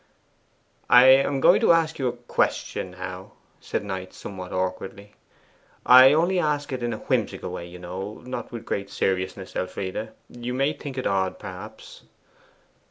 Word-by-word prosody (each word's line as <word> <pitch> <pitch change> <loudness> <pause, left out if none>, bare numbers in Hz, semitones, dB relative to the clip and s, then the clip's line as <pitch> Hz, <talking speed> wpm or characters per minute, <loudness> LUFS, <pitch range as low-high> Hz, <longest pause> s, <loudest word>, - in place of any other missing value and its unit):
'I 125 +1 +8
am 135 +1 +4
going 180 - +6
to 220 - +6
ask 165 -2 +1
you 130 - 0
a 120 - -1
question 120 0 -2
now,' - - -8 0.3
said - - -3
Knight, 95 -2 -6
somewhat 95 -2 -8
awkwardly. 95 +2 -4 0.7
'I 130 +2 +9
only 175 +4 +2
ask 145 -3 -1
it 130 - -4
in 120 0 -1
a 110 - -3
whimsical - - -2
way, 85 - -6
you 90 +1 -11
know: 95 +4 -6
not 125 - -6
with 115 -1 -7
great 100 -2 -3
seriousness, 95 0 -2
Elfride. 95 +3 -4 0.2
You 120 +1 -6
may 135 +3 +1
think 140 -2 -8
it 130 - -3
odd, 95 -1 0
perhaps. 105 +4 -10
115 Hz, 160 wpm, -25 LUFS, 95-135 Hz, 0.7 s, I